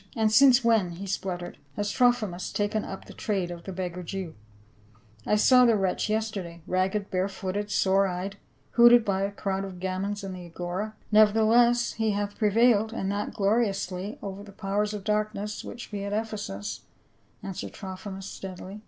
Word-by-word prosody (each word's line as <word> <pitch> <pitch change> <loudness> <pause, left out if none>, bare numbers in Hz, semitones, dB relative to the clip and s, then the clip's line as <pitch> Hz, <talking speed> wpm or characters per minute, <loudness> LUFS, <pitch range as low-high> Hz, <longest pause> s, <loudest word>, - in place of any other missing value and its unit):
" - - -22
And 220 -1 +3
since 255 +2 +6
when," 220 -7 +3
he 185 +4 -7
spluttered, 180 -2 -4
" - - -34
has 205 0 -1
Trophimus 230 -8 +1
taken 205 +1 -1
up 190 - -7
the - - -11
trade 195 -5 -2
of 170 -1 -8
the 195 - -5
beggar 180 -1 -4
Jew? 180 -1 -5 0.9
I - - +3
saw 250 +4 +6
the 235 -2 +5
wretch 195 +1 0
yester 220 -1 -1
day, 170 -1 -10
ragged, 190 +2 0
bare 185 +1 +1
footed, 195 +2 -4
sore 195 -1 +3
eyed, 190 +2 -4 0.3
hooted 240 -1 +7
by 195 -2 0
a 200 +1 0
crowd 195 -1 -2
of 190 -2 -7
gamins 190 +3 -3
in 195 -1 -5
the 180 -1 -8
Agora." 180 +5 -4
" - - -34
Nevertheless 225 +3 +5
he 220 0 0
hath 205 0 -3
prevailed, 220 0 +4
and 195 -4 -2
that 205 +1 -3
glori 215 +4 +3
ously, 195 0 -4
over 195 0 -5
the 205 0 -11
powers 205 +1 -1
of 205 - -6
darkness 210 0 -2
which 240 - -8
be 200 -1 -4
at 200 0 -3
Ephesus," 205 - -4 0.6
answered 195 -2 -6
Trophimus 190 0 -7
steadily. 190 +1 -8
200 Hz, 185 wpm, -27 LUFS, 190-215 Hz, 0.9 s, hooted